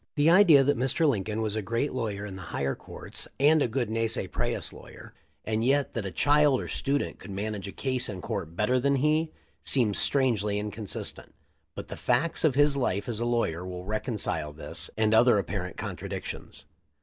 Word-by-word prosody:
The 150 Hz, +2 st, +4 dB
idea 170 Hz, -7 st, +7 dB
that 140 Hz, -2 st, +1 dB
Mr. 135 Hz, +5 st, +2 dB
Lincoln 110 Hz, -3 st, 0 dB
was 105 Hz, -1 st, -1 dB
a 110 Hz, -, -1 dB
great 115 Hz, +8 st, -1 dB
law 125 Hz, -3 st, -1 dB
yer 100 Hz, -1 st, -5 dB
in 100 Hz, -2 st, -7 dB
the 95 Hz, -, -8 dB
higher 70 Hz, 0 st, -1 dB
courts -, -, -5 dB
and 150 Hz, +2 st, +5 dB
a -, -, +3 dB
good 120 Hz, +1 st, -1 dB
nisi 115 Hz, -2 st, 0 dB
prius 90 Hz, -, -2 dB
lawyer, -, -, -13 dB, 0.3 s
and 110 Hz, +1 st, 0 dB
yet 140 Hz, +3 st, +2 dB
that 115 Hz, -6 st, -3 dB
a -, -, -5 dB
child 145 Hz, -, +4 dB
or -, -, -5 dB
student 140 Hz, +1 st, -2 dB
could -, -, -11 dB
manage 100 Hz, 0 st, -4 dB
a -, -, -6 dB
case 130 Hz, 0 st, -2 dB
in 95 Hz, -3 st, -5 dB
court 90 Hz, -5 st, -5 dB
better 125 Hz, +7 st, +2 dB
than 140 Hz, +2 st, +2 dB
he, 155 Hz, +3 st, +1 dB, 0.3 s
seems 115 Hz, -7 st, +1 dB
strangely 110 Hz, -7 st, +2 dB
inconsistent, 105 Hz, 0 st, -5 dB, 0.4 s
but -, -, -7 dB
the -, -, -5 dB
facts 170 Hz, 0 st, 0 dB
of 150 Hz, -5 st, +3 dB
his 145 Hz, 0 st, +4 dB
life 100 Hz, -7 st, -1 dB
as 115 Hz, -3 st, -3 dB
a 120 Hz, -, -1 dB
lawyer 115 Hz, -8 st, 0 dB
will 90 Hz, 0 st, -7 dB
reconcile 105 Hz, -, -1 dB
this 75 Hz, -, -5 dB
and 110 Hz, 0 st, +2 dB
other 115 Hz, 0 st, +6 dB
apparent 90 Hz, -3 st, -3 dB
contradictions. -, -, -6 dB
115 Hz, 195 wpm, -28 LUFS, 100-140 Hz, 0.4 s, idea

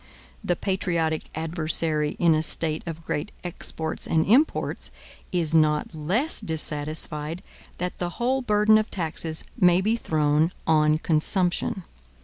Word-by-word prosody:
The 175 Hz, -, +1 dB
patriotic 170 Hz, -5 st, -1 dB
adversary 160 Hz, -1 st, 0 dB
in 170 Hz, -2 st, +4 dB
a 155 Hz, -, +2 dB
State 160 Hz, 0 st, -1 dB
of 165 Hz, 0 st, -6 dB
great 150 Hz, +8 st, -3 dB
exports 160 Hz, -2 st, -3 dB
and 160 Hz, -1 st, +2 dB
imports, 265 Hz, +10 st, +2 dB, 0.4 s
is 170 Hz, -4 st, +1 dB
not 155 Hz, 0 st, +2 dB
less 190 Hz, -, 0 dB
dissatisfied 155 Hz, -1 st, -1 dB, 0.3 s
that 180 Hz, +1 st, -4 dB
the 175 Hz, -, -1 dB
whole 260 Hz, +3 st, +1 dB
burden 215 Hz, -2 st, +4 dB
of 215 Hz, -, -3 dB
taxes 160 Hz, -2 st, -2 dB, 0.2 s
may 180 Hz, -2 st, +5 dB
be 215 Hz, +4 st, +1 dB
thrown 155 Hz, -5 st, +1 dB, 0.2 s
on 155 Hz, -1 st, +3 dB
consumption. 175 Hz, +4 st, 0 dB
165 Hz, 125 wpm, -25 LUFS, 155-185 Hz, 0.4 s, may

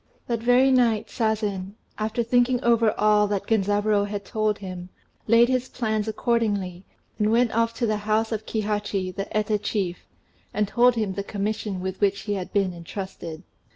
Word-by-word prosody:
That 235 Hz, -2 st, -1 dB
very 245 Hz, +3 st, +4 dB
night 235 Hz, -4 st, +2 dB
Sazen, 210 Hz, -4 st, -1 dB, 0.2 s
after 220 Hz, +2 st, -1 dB
thinking 245 Hz, +1 st, +2 dB
over 230 Hz, -2 st, +4 dB
all 210 Hz, 0 st, +4 dB
that 200 Hz, -2 st, -2 dB
Genzaburô 205 Hz, -1 st, +2 dB
had 200 Hz, -1 st, -5 dB
told 215 Hz, -1 st, 0 dB
him, 185 Hz, -2 st, -7 dB, 0.4 s
laid 230 Hz, +2 st, +6 dB
his 255 Hz, 0 st, 0 dB
plans 220 Hz, -3 st, -1 dB
accordingly, 205 Hz, -6 st, -1 dB, 0.4 s
and 210 Hz, 0 st, +2 dB
went 235 Hz, +1 st, +3 dB
off 230 Hz, +1 st, +1 dB
to 240 Hz, -, 0 dB
the 215 Hz, -1 st, +1 dB
house 215 Hz, +2 st, 0 dB
of 220 Hz, -1 st, -3 dB
Kihachi, 205 Hz, -4 st, -2 dB
the 195 Hz, -, -5 dB
Eta 210 Hz, 0 st, +1 dB
chief, 200 Hz, -4 st, -3 dB, 0.5 s
and 210 Hz, -1 st, +1 dB
told 245 Hz, +3 st, +4 dB
him 215 Hz, -4 st, -1 dB
the 200 Hz, -, -3 dB
commission 205 Hz, -1 st, -3 dB
with 190 Hz, +1 st, -5 dB
which 200 Hz, 0 st, +2 dB
he 205 Hz, -, -3 dB
had 190 Hz, -3 st, -4 dB
been 195 Hz, -3 st, +1 dB
entrusted. 170 Hz, -1 st, -7 dB
210 Hz, 170 wpm, -25 LUFS, 200-230 Hz, 0.5 s, laid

